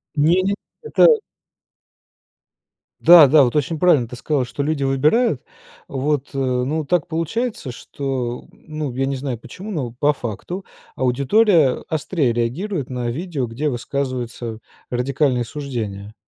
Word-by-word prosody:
Не-не, 175 +6 +3 0.3
это 455 - +5 1.9
Да-да, 155 -4 +8
вот 125 +1 0
очень 150 +2 0
правильно 150 -9 +4
ты 125 - -8
сказала, 135 +1 -1
что 125 - -5
люди 145 0 -1
выбирают, 150 - +2 0.5
вот, 140 +1 -1
ну, 135 +3 -1
так 175 +2 +1
получается, 165 - -2
что, 125 -1 -4
ну, 155 -4 -6
я 135 +2 -1
не 135 - -1
знаю 130 -3 -4
почему, 195 - -9
но 145 - -2
по 150 +1 +3
факту 140 - -6 0.3
аудитория 140 - +3
острее 155 -4 0
реагирует 135 - -2
на 125 -1 -2
видео, 145 -1 -3
где 130 +7 -2
высказываются 120 -3 -4 0.3
радикальные 125 0 +1
суждения. 110 -7 -5
140 Hz, 120 wpm, -21 LUFS, 125-160 Hz, 1.9 s, Да-да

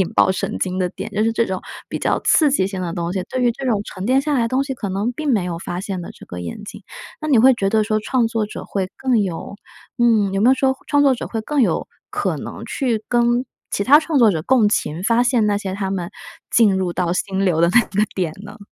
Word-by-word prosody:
引 185 - +1
爆 - - +4
神 190 - -3
经 185 -1 -2
的 180 -1 +1
点， 215 - -7
就 210 +1 -1
是 225 - +2
这 230 +1 +1
种 190 -3 -3 0.3
比 - - -4
较 - - 0
刺 305 -3 +4
激 265 -9 +2
性 195 -1 -5
的 170 -2 -3
东 170 0 -3
西， 190 -2 -2
对 255 - -2
于 240 -1 +3
这 270 +3 -6
种 215 -5 +1
沉 190 0 -6
淀 260 +3 +3
下 300 - -1
来 235 -5 +1
东 260 +3 0
西 275 - -4
可 215 -5 -5
能 200 +6 -1
并 300 +3 -2
没 210 -8 +2
有 170 -2 -4
发 175 0 -5
现 195 -2 -4
的 170 - -8
这 - - -14
个 90 - -8
眼 90 - -7
睛。 210 0 -9 0.4
那 310 - -4
你 270 -6 +4
会 260 +4 +7
觉 200 -5 0
得 215 +1 +2
说 215 0 0
创 240 +2 +1
作 225 -2 -1
者 - - -8
会 190 -2 -3
更 255 -4 +1
有 190 0 -4 0.4
嗯， 220 -5 +3
有 195 - 0
没 230 - +5
有 265 - +6
说 265 0 +1
创 290 0 +3
作 275 -2 +4
者 240 - -6
会 225 -1 -4
更 290 +4 0
有 235 - +1 0.2
可 - - -2
能 - - -7
去 235 -6 -1
跟 240 +1 +2 0.3
其 200 - -1
他 290 +4 +7
创 315 -2 0
作 230 -4 +6
者 165 -5 -1
共 250 +1 +3
情 170 -5 -1
发 230 +4 +3
现 245 -3 +2
那 205 -1 +1
些 190 -2 -4
他 195 -1 -3
们 180 -3 -3 0.4
进 215 -5 +4
入 185 -2 -1
到 175 -1 -1
心 190 +1 -1
流 170 -4 +2
的 170 - +4
那 245 - +6
个 205 -1 -1
点 175 -5 -1
呢？ 210 +2 -11
215 Hz, 290 characters per minute, -20 LUFS, 190-245 Hz, 0.4 s, 会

